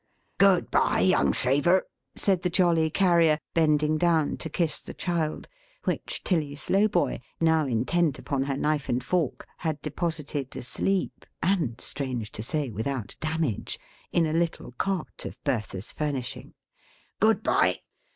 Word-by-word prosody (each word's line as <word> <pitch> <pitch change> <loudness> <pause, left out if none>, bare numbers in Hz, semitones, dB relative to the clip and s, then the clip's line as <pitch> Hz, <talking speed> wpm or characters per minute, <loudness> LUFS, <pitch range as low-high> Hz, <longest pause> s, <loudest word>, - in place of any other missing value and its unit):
"Good 195 -3 +4
bye - - +3
young 185 - +4
shaver!" 145 +8 +3 0.3
said 190 -3 +3
the 180 - 0
jolly 170 -3 +3
Carrier, 170 -3 +4 0.2
bending 155 -1 +3
down 165 -3 +2
to 160 - -5
kiss 155 0 -1
the - - -9
child; 170 -4 -2 0.4
which - - -2
Tilly 155 -6 0
Slowboy, 195 +4 +2 0.2
now 160 -2 +3
intent 135 +6 +1
upon 135 -1 -2
her 135 -1 -2
knife 150 0 0
and 125 0 0
fork, 170 -2 -1
had 160 -3 -2
deposited 150 -3 -3
asleep 190 +9 -2 0.2
(and 170 - +1
strange 125 -6 -3
to - - -6
say, 145 +2 -2
without 115 +2 -3
damage) 155 -7 -2 0.3
in 170 - +3
a 155 - -1
little 165 -5 -1
cot 185 +7 -3
of - - -7
Bertha's 105 -7 -2
furnishing; 140 -5 -4 0.6
"good - - +3
bye! - - +2
155 Hz, 140 wpm, -27 LUFS, 135-170 Hz, 0.6 s, Good